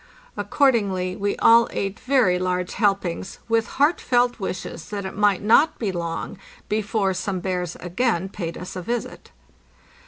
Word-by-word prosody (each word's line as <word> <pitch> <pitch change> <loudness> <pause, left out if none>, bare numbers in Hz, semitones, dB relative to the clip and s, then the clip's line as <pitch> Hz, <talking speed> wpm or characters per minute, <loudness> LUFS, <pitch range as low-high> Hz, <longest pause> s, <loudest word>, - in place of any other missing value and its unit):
Accordingly 200 -10 +1
we 200 +1 -1
all 230 0 +6
ate 195 +2 -3
very 250 -10 +2
large 180 0 -1
helpings, 195 -3 -1
with 225 -1 +1
heartfelt 250 -5 +2
wishes 185 -4 -5
that 200 -2 -4
it 190 - -6
might 205 -2 +2
not 255 +9 +4
be 210 -5 -1
long 170 +2 -4 0.3
before 210 -2 0
some 185 0 -3
bears 180 -2 -3
again 190 0 -1
paid 175 -4 -5
us 180 - -8
a 185 - -4
visit. 235 +6 -4
195 Hz, 145 wpm, -23 LUFS, 180-230 Hz, 0.3 s, all